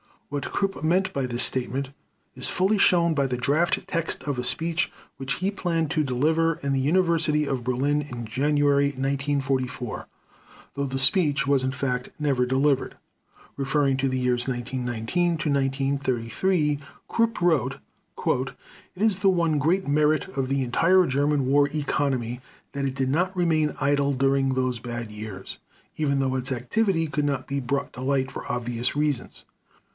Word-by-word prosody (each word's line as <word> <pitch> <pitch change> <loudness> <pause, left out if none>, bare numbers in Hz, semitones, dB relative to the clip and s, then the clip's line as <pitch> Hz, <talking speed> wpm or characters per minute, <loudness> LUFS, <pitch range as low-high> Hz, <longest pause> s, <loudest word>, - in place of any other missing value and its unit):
What 145 0 -3
Krupp 195 -1 -1
meant 180 +4 +2
by 135 -2 -1
this 120 0 +1
statement 130 +1 -1 0.5
is - - +2
fully 195 +4 +2
shown 170 -3 +4
by 140 -3 +1
the 125 -1 -2
draft 145 +7 +1
text 165 -1 -3
of 140 -4 -2
a - - -1
speech 165 +7 0 0.3
which 135 0 -2
he 190 +2 -1
planned 165 -6 -1
to 155 -3 +1
deliver 160 +6 +2
in 140 0 0
the 135 - +1
University 160 0 +2
of 130 -4 -3
Berlin 140 +4 +1
in 125 -5 -6
January 140 +4 +2
1944, 135 -3 -2 0.7
though 140 - -2
the 135 -1 -3
speech 140 -1 +3
was 140 -2 +2
in 130 - -1
fact 125 -2 -2
never 140 -4 +1
delivered. 135 +2 +1 0.6
Referring 135 0 +1
to 135 0 +1
the 130 - -1
years 125 -1 0
1919 125 +6 -1
to 155 - -2
1933, 140 - 0 0.3
Krupp 230 0 +1
wrote: 165 -8 +2 1.2
"It 185 - -9
is 210 -4 +2
the 200 -1 +4
one 170 -5 +2
great 175 +7 +1
merit 150 +1 +2
of 135 -1 -2
the 135 0 0
entire 180 +9 +4
German 145 0 +1
war 140 +2 +4
economy 135 -5 -1 0.3
that 140 0 -3
it 135 -1 -2
did 130 -1 0
not 180 +7 0
remain 160 -4 +1
idle 140 0 +2
during 135 0 +2
those 130 -2 -1
bad 120 -1 -5
years, 105 -3 -8 0.4
even 140 -3 +1
though 130 -1 0
its 130 +1 -2
activity 165 - 0
could 150 -1 -1
not 135 -3 -1
be 140 0 -2
brought 140 +2 -2
to 125 - -8
light, 135 0 0
for - - -7
obvious 120 +1 -2
reasons. 145 -4 -2
140 Hz, 160 wpm, -25 LUFS, 130-155 Hz, 1.2 s, shown